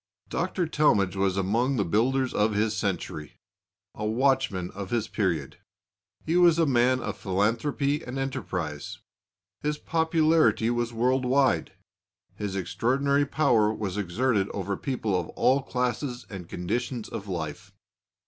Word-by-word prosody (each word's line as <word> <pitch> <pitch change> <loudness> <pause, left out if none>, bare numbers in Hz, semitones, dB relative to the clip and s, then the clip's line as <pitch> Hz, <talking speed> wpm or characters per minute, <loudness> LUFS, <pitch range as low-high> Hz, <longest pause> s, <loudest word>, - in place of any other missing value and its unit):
Dr. 180 - -1
Talmage 105 - +2
was 95 -1 +1
among 115 +8 +1
the 100 -5 +1
builders 125 +8 +1
of 105 +1 +2
his 105 +1 +1
century 75 -1 -3 0.6
a 105 - -6
watchman 115 -5 +1
of 100 -1 -7
his 120 -3 0
period. 85 -9 -2 0.7
He 165 +2 +1
was 175 -2 +6
a 165 - +4
man 130 -1 +3
of - - -4
philanthropy 115 +9 0
and 125 +2 -6
enterprise. 90 - -4 0.6
His 150 0 -1
popularity 160 -7 +2
was 120 0 -1
world 125 +3 +1
wide; 130 - +2 0.6
his 100 -2 -4
extraordinary 140 +9 +1
power 120 -8 +3
was 105 -4 -4
exerted 105 +2 0
over 100 0 -2
people 115 -6 -2
of - - -2
all 135 +2 +3
classes 125 0 -2
and 90 -4 -8
conditions 120 +6 -3
of 100 - -7
life. 80 -6 -5
120 Hz, 135 wpm, -27 LUFS, 100-135 Hz, 0.7 s, was